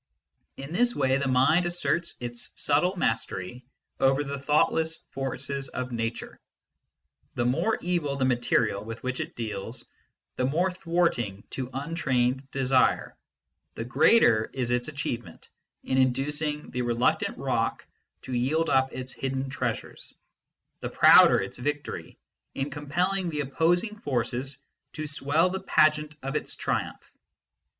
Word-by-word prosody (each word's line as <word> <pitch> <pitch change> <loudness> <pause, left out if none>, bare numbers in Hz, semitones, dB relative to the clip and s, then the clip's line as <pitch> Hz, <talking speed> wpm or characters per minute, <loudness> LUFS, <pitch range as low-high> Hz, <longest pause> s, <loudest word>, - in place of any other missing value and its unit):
In 140 +4 -7
this 240 +5 +2
way 130 -2 +2
mind 140 +6 +3
asserts 175 0 -1
its 120 -1 -6
subtle 165 +6 +2
mastery 115 - -2 0.4
over 135 +2 +3
the 140 0 -5
thoughtless 160 +3 +2
forces 135 +1 -3
of 130 0 -4
Nature. 115 -1 -4 1.0
The 120 - 0
more 165 - +1
evil 170 -6 0
the 135 -1 0
material 120 -5 +1
with 115 +1 -8
which 130 0 -2
it 160 +2 -5
deals, 110 +1 -5 0.5
the 125 - +1
more 170 +8 +1
thwarting 165 - -1
to 130 -2 -4
untrained 135 -3 -1
desire, 130 -1 +2 0.6
the 115 - -4
greater 125 - +4
is 125 -2 -2
its 120 0 0
achievement 120 - -5 0.3
in 130 - +1
inducing 150 +4 0
the 125 - -2
reluctant 120 0 +1
rock - - -1 0.4
to 130 - -6
yield 145 +7 +1
up 130 0 +3
its 130 0 -6
hidden 135 0 -3
treasures, 125 -5 -4 0.6
the - - -4
prouder - - +7
its - - -5
victory 145 +3 -4 0.4
in 135 +2 -2
compelling 175 +6 -1
the 150 -2 -2
opposing 175 +9 +1
forces 130 - -2 0.4
to 155 - -4
swell 150 +4 +1
the 190 - -2
pageant 155 -4 +3
of 135 0 -3
its - - -3
triumph. - - -3
135 Hz, 130 wpm, -27 LUFS, 125-155 Hz, 1.0 s, prouder